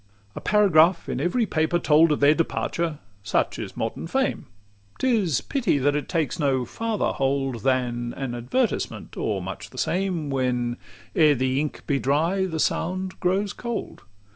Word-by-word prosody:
LI 100 0 -34
A - - -5
paragraph 180 -5 +4
in 130 - -2
every 180 +9 +1
paper 160 -2 +1
told 160 -1 +4
Of 150 - 0
their 145 +1 +6
departure: 165 0 -1 0.2
such 105 +3 0
is - - -6
modern - - -3
fame: - - -1 0.5
'T 260 -2 +2
is 165 - 0
pity 240 - 0
that 145 +1 +2
it 150 -2 -3
takes 160 -7 -1
no 135 -4 +1
farther 225 - -1
hold 135 -3 -1
Than 120 -1 0
an 135 -3 -3
advertisement, 125 - -2
or - - -2
much - - -7
the - - -14
same; 180 -6 -1
When, 125 -2 0 0.4
ere 155 -3 +5
the 130 +1 0
ink 150 0 -4
be 140 -1 +1
dry, 165 +9 +1
the 160 -3 -4
sound 185 +4 -1
grows 195 +3 0
cold. 235 -2 -5
150 Hz, 165 wpm, -24 LUFS, 130-185 Hz, 0.5 s, their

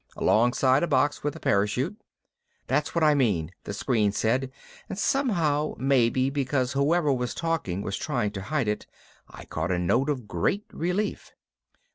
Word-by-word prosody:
Alongside 130 +4 +3
a 175 - +1
box 145 0 +1
with 145 -1 -2
a - - -8
parachute." 125 - 0 0.7
"That's - - -1
what 170 - +2
I 150 -1 +6
mean," 100 - +1
the - - -4
screen 105 -1 +1
said 125 +6 0 0.4
and - - -5
somehow, 170 - +1
maybe 130 0 +2
because 135 -2 0
whoever 145 +2 +2
was 125 -1 -2
talking 155 - -2
was 100 - -3
trying 120 -8 -1
to 100 -2 -6
hide 125 +5 -1
it, 105 - -2 0.4
I - - -11
caught 80 +2 -3
a 90 - +1
note 120 - +1
of 130 -7 -2
great 105 - -1
relief. 180 +6 -2
130 Hz, 160 wpm, -26 LUFS, 105-150 Hz, 0.7 s, I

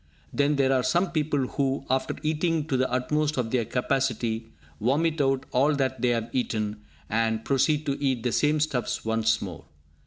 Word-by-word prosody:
Then 145 +1 +2
there 135 -1 +3
are 130 - +3
some 175 +7 +1
people 150 -4 0
who, 135 +1 -1
after 130 +1 0
eating 160 0 0
to 135 - +1
the 130 0 +1
utmost 150 +4 0
of 115 -3 -1
their 120 -3 +1
capacity, 120 -2 -1 0.3
vomit 150 +6 +1
out 135 -1 +1
all 140 +4 +3
that 130 -3 -1
they 125 - +3
have 115 -1 -1
eaten, 110 -4 -1 0.3
and 110 0 0
proceed 150 +3 +2
to 140 0 -2
eat 130 -4 +1
the 125 - 0
same 150 +4 +2
stuffs 140 -7 -1
once 110 -1 +1
more! 85 -5 -8
130 Hz, 180 wpm, -26 LUFS, 115-145 Hz, 0.3 s, there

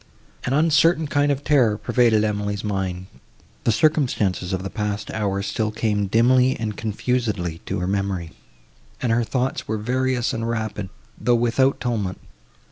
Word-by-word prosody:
An 130 - 0
uncertain 160 +2 +4
kind 145 0 +1
of 140 0 -2
terror 125 -9 +3
pervaded 115 -2 +3
Emily's 105 -1 -2
mind; 95 -3 -2 0.6
the - - +4
circumstances 110 - +1
of 95 0 -2
the 95 - -4
past 105 0 -3
hour 100 -2 -1
still 110 +2 -1
came 105 -2 0
dimly 125 +5 +3
and 110 -2 -3
confusedly 105 -6 -2
to - - -2
her 90 - -2
memory; 95 -4 -2 0.7
and 120 - 0
her 120 +1 +2
thoughts 130 +3 -2
were 110 - -1
various 125 +2 0
and 115 0 -2
rapid, 110 -4 -3 0.3
though 120 0 +3
without 120 +3 +2
tumult. 110 -7 -2
110 Hz, 150 wpm, -22 LUFS, 100-125 Hz, 0.7 s, uncertain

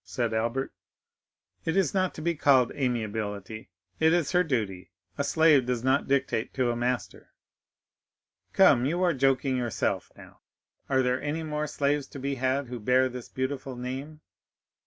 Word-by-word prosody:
said 120 -3 -2
Albert. 115 +4 -1 0.9
"It 160 +3 -1
is 190 -7 +2
not 185 -2 0
to 155 - -7
be 170 +1 +1
called 140 -5 +4
amiability, 110 -5 -3 0.3
it 160 +1 +4
is 175 -4 +1
her 180 0 +4
duty; 105 - -2 0.3
a - - -1
slave 155 -6 +4
does 125 -2 -1
not 130 +2 +2
dictate 130 -4 0
to 125 -2 +1
a - - -2
master." 120 +1 -3 1.2
"Come; 120 +2 +5
you 175 +5 0
are 175 -2 +3
joking 135 -1 +1
yourself 120 -3 -2
now. - - -15 0.5
Are 130 -1 +3
there 125 0 0
any 150 +3 -3
more 150 -1 -2
slaves 145 -1 0
to 140 - -9
be 140 +1 -2
had 135 +1 0
who 125 -1 -7
bear 130 +4 +3
this 125 -1 -8
beautiful 130 0 -4
name?" 135 +5 -6
130 Hz, 160 wpm, -27 LUFS, 125-150 Hz, 1.2 s, Come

